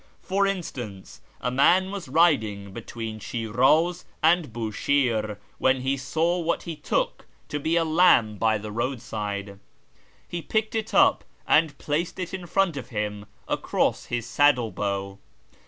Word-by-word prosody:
For 200 Hz, +1 st, +1 dB
instance, 115 Hz, -, -5 dB, 0.2 s
a 125 Hz, -, -1 dB
man 180 Hz, +9 st, +4 dB
was 200 Hz, -6 st, -6 dB
riding 110 Hz, -, +2 dB
between 110 Hz, 0 st, -6 dB
Shiraz 130 Hz, -, +1 dB, 0.2 s
and 165 Hz, -4 st, +3 dB
Bushire 110 Hz, -1 st, 0 dB, 0.2 s
when 130 Hz, 0 st, +2 dB
he 135 Hz, +2 st, 0 dB
saw 160 Hz, +7 st, 0 dB
what 170 Hz, 0 st, -1 dB
he 170 Hz, -2 st, -5 dB
took 150 Hz, -, -2 dB, 0.2 s
to 145 Hz, -, -2 dB
be 160 Hz, +3 st, 0 dB
a 165 Hz, -1 st, +3 dB
lamb 155 Hz, -, +4 dB
by 110 Hz, -1 st, +3 dB
the 105 Hz, 0 st, -7 dB
roadside. 105 Hz, -4 st, -4 dB, 0.7 s
He 175 Hz, -, -4 dB
picked 220 Hz, +5 st, -1 dB
it 220 Hz, -1 st, -3 dB
up -, -, +5 dB, 0.2 s
and 155 Hz, -1 st, +3 dB
placed 155 Hz, +4 st, -2 dB
it 185 Hz, -1 st, -5 dB
in 185 Hz, -2 st, -5 dB
front 185 Hz, -3 st, +1 dB
of 135 Hz, -, -7 dB
him 105 Hz, -2 st, -4 dB, 0.2 s
across -, -, 0 dB
his 120 Hz, -1 st, -3 dB
saddle 125 Hz, -2 st, +3 dB
bow. 100 Hz, -1 st, -3 dB
130 Hz, 145 wpm, -25 LUFS, 110-170 Hz, 0.7 s, up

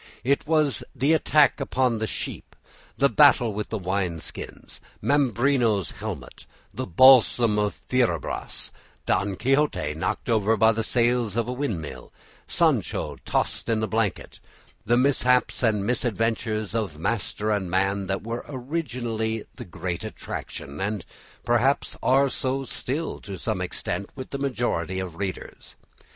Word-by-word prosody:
It 140 Hz, +4 st, +1 dB
was 155 Hz, -6 st, +2 dB
the 145 Hz, +4 st, +3 dB
attack 150 Hz, -3 st, +4 dB
upon 125 Hz, -3 st, 0 dB
the 110 Hz, -, -1 dB
sheep, -, -, -5 dB, 0.4 s
the 140 Hz, +4 st, +5 dB
battle 135 Hz, -6 st, +5 dB
with 105 Hz, +1 st, -4 dB
the 110 Hz, -, -2 dB
wine 90 Hz, -3 st, -1 dB
skins, -, -, -7 dB, 0.2 s
Mambrino's 125 Hz, -, +2 dB
helmet, -, -, -7 dB, 0.3 s
the -, -, -4 dB
balsam 120 Hz, +1 st, +6 dB
of 105 Hz, -1 st, 0 dB
Fierabras, 125 Hz, -2 st, -2 dB, 0.3 s
Don 100 Hz, 0 st, +1 dB
Quixote 135 Hz, -, +1 dB
knocked 80 Hz, -, -3 dB
over 110 Hz, -1 st, +2 dB
by 110 Hz, +2 st, +5 dB
the 115 Hz, 0 st, -1 dB
sails 120 Hz, -2 st, +1 dB
of 115 Hz, -, +1 dB
the 125 Hz, -, -4 dB
windmill, 95 Hz, -, -4 dB, 0.4 s
Sancho -, -, +1 dB
tossed -, -, -1 dB
in 115 Hz, -1 st, +2 dB
the 110 Hz, -, -1 dB
blanket, 110 Hz, -3 st, -2 dB, 0.4 s
the 120 Hz, +3 st, +2 dB
mishaps 125 Hz, -1 st, +2 dB
and 110 Hz, -5 st, +2 dB
misadventures 115 Hz, -2 st, -1 dB
of 105 Hz, -9 st, -2 dB
master 105 Hz, +3 st, -1 dB
and 100 Hz, -4 st, -1 dB
man, 95 Hz, +2 st, 0 dB
that 95 Hz, 0 st, -2 dB
were 115 Hz, +2 st, -4 dB
originally 120 Hz, -6 st, -3 dB
the 120 Hz, -, -9 dB
great 90 Hz, -1 st, -4 dB
attraction, 70 Hz, +6 st, -6 dB
and 100 Hz, -2 st, -2 dB, 0.4 s
perhaps 120 Hz, +4 st, +2 dB
are 135 Hz, +2 st, +4 dB
so 135 Hz, 0 st, -1 dB
still 140 Hz, +4 st, -3 dB
to 100 Hz, -2 st, -7 dB
some -, -, -2 dB
extent 95 Hz, +3 st, -3 dB
with 130 Hz, -2 st, -8 dB
the 140 Hz, -, -3 dB
majority 120 Hz, -, -1 dB
of 90 Hz, -3 st, -5 dB
readers. 95 Hz, -2 st, -6 dB
115 Hz, 140 wpm, -25 LUFS, 100-130 Hz, 0.4 s, balsam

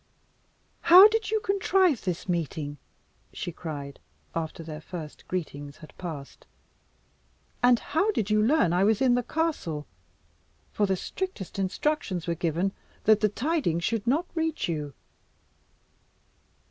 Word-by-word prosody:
"How 370 Hz, +4 st, +10 dB
did 445 Hz, 0 st, -1 dB
you 440 Hz, 0 st, +1 dB
contrive 380 Hz, -, +2 dB
this 180 Hz, -1 st, -3 dB
meeting?" 155 Hz, -4 st, -2 dB, 0.5 s
she 175 Hz, -, -5 dB
cried, 145 Hz, -4 st, -7 dB, 0.3 s
after 165 Hz, 0 st, -4 dB
their 155 Hz, -1 st, -7 dB
first 160 Hz, -3 st, -9 dB
greetings 145 Hz, -5 st, -5 dB
had 155 Hz, -, -14 dB
passed. 155 Hz, -6 st, -8 dB, 1.1 s
"And 245 Hz, -1 st, +6 dB
how 325 Hz, -, 0 dB
did 220 Hz, -, 0 dB
you 215 Hz, 0 st, +4 dB
learn 225 Hz, -, +3 dB
I 180 Hz, +2 st, +3 dB
was 215 Hz, +1 st, +3 dB
in 260 Hz, -2 st, +4 dB
the 245 Hz, -, +2 dB
castle, 245 Hz, -, -2 dB, 0.9 s
for 205 Hz, -, +1 dB
the 190 Hz, -, +1 dB
strictest 210 Hz, -, -5 dB
instructions 195 Hz, -, -1 dB
were 170 Hz, -, 0 dB
given 170 Hz, +3 st, 0 dB, 0.3 s
that 215 Hz, 0 st, +5 dB
the 215 Hz, 0 st, +3 dB
tidings 235 Hz, -, 0 dB
should 225 Hz, +1 st, -1 dB
not 300 Hz, +8 st, +2 dB
reach 320 Hz, -2 st, -1 dB
you." 150 Hz, -5 st, -4 dB
195 Hz, 135 wpm, -27 LUFS, -, 1.1 s, How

